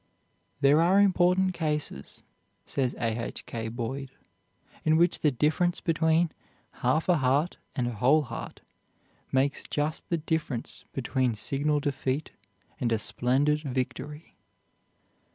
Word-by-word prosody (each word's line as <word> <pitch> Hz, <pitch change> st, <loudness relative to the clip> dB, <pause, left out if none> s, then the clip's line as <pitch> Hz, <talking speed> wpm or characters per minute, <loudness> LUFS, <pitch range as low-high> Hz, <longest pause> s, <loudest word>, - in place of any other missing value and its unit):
"There 145 Hz, +3 st, +5 dB
are 185 Hz, +4 st, +5 dB
important 185 Hz, -1 st, +3 dB
cases," 150 Hz, -, -3 dB, 0.4 s
says 130 Hz, -2 st, -1 dB
A. 115 Hz, 0 st, -1 dB
H. -, -, -6 dB
K. 115 Hz, -1 st, -4 dB
Boyd, 125 Hz, +4 st, -4 dB, 0.7 s
"in 155 Hz, 0 st, +4 dB
which 170 Hz, +1 st, +3 dB
the 150 Hz, -, +3 dB
difference 155 Hz, +6 st, +1 dB
between 160 Hz, 0 st, +2 dB, 0.5 s
half 130 Hz, +6 st, +2 dB
a 180 Hz, -2 st, +4 dB
heart 140 Hz, +5 st, +1 dB, 0.2 s
and 125 Hz, -4 st, 0 dB
a -, -, -1 dB
whole 130 Hz, +8 st, +4 dB
heart 120 Hz, -3 st, -7 dB, 0.7 s
makes 135 Hz, +2 st, +1 dB
just 150 Hz, +2 st, -2 dB
the 170 Hz, -, +1 dB
difference 155 Hz, -6 st, -3 dB
between 130 Hz, -2 st, 0 dB
signal 145 Hz, +6 st, +1 dB
defeat 140 Hz, +1 st, -2 dB, 0.5 s
and 120 Hz, -2 st, 0 dB
a 115 Hz, -, +3 dB
splendid 135 Hz, +7 st, +2 dB
victory." 145 Hz, +2 st, -4 dB
145 Hz, 125 wpm, -28 LUFS, 125-160 Hz, 0.7 s, There